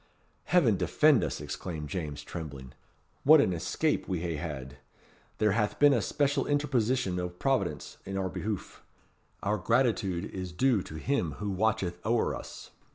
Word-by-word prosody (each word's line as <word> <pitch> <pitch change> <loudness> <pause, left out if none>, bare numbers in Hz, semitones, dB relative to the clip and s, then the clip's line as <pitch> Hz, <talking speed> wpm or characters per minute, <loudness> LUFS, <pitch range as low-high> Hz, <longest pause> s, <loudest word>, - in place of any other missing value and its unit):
"Heaven - - +4
defend - - +4
us!" - - -2
exclaimed 75 +2 -5
James, 75 -4 -4
trembling. 70 -6 -7 0.5
"What 155 +2 +8
an 95 -10 +3
escape 145 - -1
we 90 -4 -2
hae 85 -3 -2
had. 70 -5 -6 0.6
There 105 -1 +3
hath 105 0 0
been 145 -1 +6
a 120 - +2
special 140 +4 0
interposition 130 -9 +1
o' 90 0 -2
Providence 90 - -1
in 95 0 -4
our 95 -1 -1
behoof. 105 +1 -5 0.6
Our 105 +1 0
gratitude 110 -5 +1
is 90 -2 -6
due 125 +1 +3
to 80 - -9
Him 85 - -1
who 105 +7 -4
watcheth 95 -3 0
ower 115 +2 +1
us." - - -9
95 Hz, 155 wpm, -29 LUFS, 85-120 Hz, 0.6 s, What